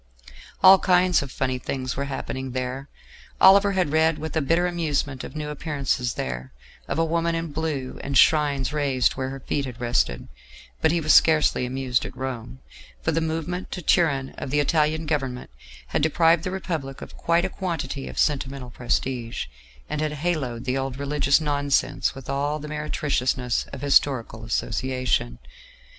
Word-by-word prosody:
All 190 0 +9
kinds 180 -1 +3
of 140 -2 -7
funny 130 -1 -1
things 130 0 -3
were 140 - -2
happening 130 -1 -5
there: 130 +2 -4 0.5
Oliver 200 +1 +7
had 180 -6 +1
read 160 0 +3
with 160 +1 -6
a 160 - +2
bitter 165 +5 +2
amusement 150 -6 -1
of 135 - -9
new 150 -1 -4
appearances 140 -5 -2
there, 65 +1 -5 0.3
of - - -2
a 165 - +3
Woman 165 +1 0
in 165 -1 -3
Blue 145 -4 -3
and 140 -1 0
shrines 145 -4 +3
raised 135 -4 +1
where 130 -1 -3
her 135 0 -6
feet 140 +2 -2
had 125 -2 -8
rested; 120 - 0 0.5
but - - +4
he 170 - +1
was 155 -2 +3
scarcely 155 -5 +4
amused 130 -1 -1
at - - -8
Rome, 130 -1 -6 0.4
for 160 - +1
the 165 +1 0
movement 165 +3 -3
to 180 - -6
Turin 140 -6 +2
of - - -5
the 145 +2 +1
Italian 155 +2 +1
Government 135 - -3 0.4
had - - 0
deprived 165 +2 +3
the - - -2
Republic 160 -8 -4
of - - -11
quite 170 +1 +1
a - - +1
quantity 165 -7 -4
of - - -8
sentimental 135 -3 -1
prestige, 120 -1 -2 0.4
and 150 0 -3
had 155 -1 -1
haloed 145 -7 -2
the 130 +1 0
old 135 -1 -3
religious 140 0 +2
nonsense 145 -2 0
with 135 -1 -10
all 145 +2 -1
the 150 0 -8
meretriciousness 140 -5 -1
of - - -7
historical 130 -5 +2
association. 120 - -1
140 Hz, 170 wpm, -24 LUFS, 130-160 Hz, 0.5 s, All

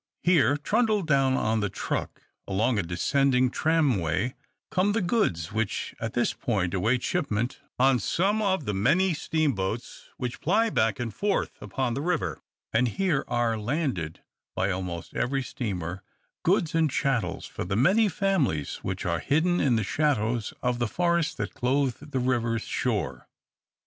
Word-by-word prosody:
Here, 145 -6 +4
trundled 215 +4 +1
down 135 -3 +3
on 110 -3 +1
the 105 -1 0
truck - - -4 0.2
along 110 +4 +1
a - - +3
descending 125 +9 +2
tram 155 -9 +2
way, 95 +9 -1 0.4
come 195 +2 +2
the 225 - +1
goods 105 - 0
which 110 -1 -2
at 115 -1 -3
this 120 - +1
point 95 -7 -1
await 115 +7 +1
shipment 115 +4 -1 0.2
on 130 0 +4
some 195 - +1
of 190 -7 +1
the 105 - -1
many 170 - +3
steamboats 135 - -2
which 125 -2 -4
ply 220 +7 +2
back 110 - +1
and 120 -2 -3
forth 200 -1 0
upon 130 -3 -2
the 135 - -2
river; 175 +1 -1 0.3
and 120 +3 +3
here 185 -8 +1
are 120 -2 0
landed 115 - -2 0.3
by 95 - +1
almost 90 -2 -4
every 135 +2 0
steamer 95 -8 -4 0.4
goods 170 -2 +2
and 160 -1 +3
chattels 125 -9 -1
for - - -5
the 95 +2 -2
many 195 - +4
families 170 - 0
which 95 0 -4
are 85 -1 0
hidden 170 - +2
in 130 -4 +3
the 110 - +1
shadows 120 -3 0
of 125 -1 0
the 120 - +1
forests 170 +4 +1
that 105 -4 -4
clothe 135 +2 0
the 135 - -1
river's 120 -3 0
shore. - - -2
125 Hz, 160 wpm, -27 LUFS, 110-160 Hz, 0.4 s, Here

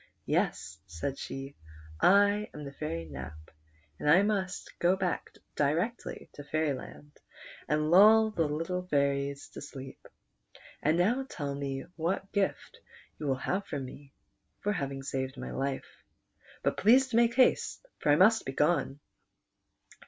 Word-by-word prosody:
" - - -45
Yes," 90 -1 -1
said 90 +11 -4
she, 135 +1 -6 0.3
" - - -19 0.2
I 205 +2 +4
am 150 - -7
the 140 - -7
Fairy 135 - -4
Nap, 75 +2 -9 0.5
and 150 - 0
I 180 +6 +7
must 195 -3 -2
go 175 +2 +4
back 190 -2 -2 0.3
directly 165 +12 -1
to 145 - -9
Fairyland 145 -1 -3 0.6
and 150 +1 +1
lull 220 +4 +7
the 165 -7 0
young 165 +5 -3
fairies 140 -2 0
to - - -9
sleep; 135 -2 -10 0.7
and 155 +3 +2
now 240 +9 +1
tell 145 -3 -4
me 140 -1 -4
what 180 +4 -2
gift 200 -2 -2 0.4
you 150 - -3
will 135 - +2
have 195 +2 -1
from 140 -3 -4
me 140 +2 -12 0.5
for 210 - 0
having 135 -5 -4
saved 130 0 -3
my - - -6
life. 135 0 -4 0.6
But - - 0
please 255 +6 +5
to 230 - -2
make 235 0 +4
haste, 260 - +2
for 145 - +2
I - - +7
must 215 +7 +5
be 135 - -5
gone." 150 -2 +1
150 Hz, 150 wpm, -30 LUFS, 140-195 Hz, 0.7 s, I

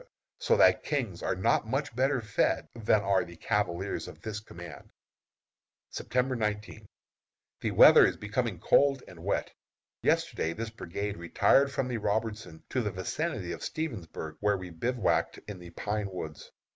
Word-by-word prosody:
so 475 -1 +3
that - - +5
kings 120 - -2
are - - 0
not 95 +4 +1
much 135 +1 -2
better 135 +1 +2
fed 105 -2 0
than 110 -2 +2
are 100 -1 +2
the 85 - -11
cavaliers 95 +1 -1
of - - -11
this 105 -2 -4
command. 85 -7 -11 1.0
September 125 +1 -1
19. 105 -1 -3 0.7
The - - -1
weather - - +8
is - - -3
becoming 110 -1 -2
cold 135 +9 +3
and - - -12
wet. - - -1 0.5
Yesterday 80 - +1
this 110 +4 -5
brigade 100 -1 -4
retired 135 +11 +3
from 135 -1 -1
the 125 -2 -2
Robertson 105 -5 -2
to 130 - 0
the 105 - -1
vicinity 95 - -3
of 85 - -6
Stevensburg, 95 - -5
where 105 -1 +2
we 90 -1 -8
bivouacked 115 +7 0
in 105 -3 -7
the 90 -1 -10
pine 105 +3 -3
woods. 80 -5 -7
105 Hz, 155 wpm, -29 LUFS, 90-125 Hz, 1.0 s, weather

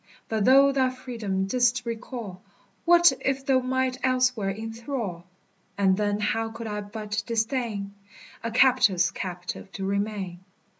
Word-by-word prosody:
But 220 -2 0
thou 275 +2 +7
thy 265 -2 +2
freedom 230 -7 -3
didst 245 +3 +1
recall, 230 -5 -6 0.5
That 345 0 +7
if 270 0 -1
thou 265 -1 +4
might 260 0 -1
elsewhere 255 -5 +1
inthrall; 225 -3 -5 0.5
And 190 -2 +3
then 205 0 0
how 225 +2 0
could 230 +1 -8
I 210 -1 -3
but 210 +1 -4
disdain 225 -3 -2 0.5
A 230 - -1
captive's 225 -8 +4
captive 180 +1 -6
to 195 - -4
remain? 200 -2 -2
225 Hz, 135 wpm, -26 LUFS, 200-255 Hz, 0.5 s, thou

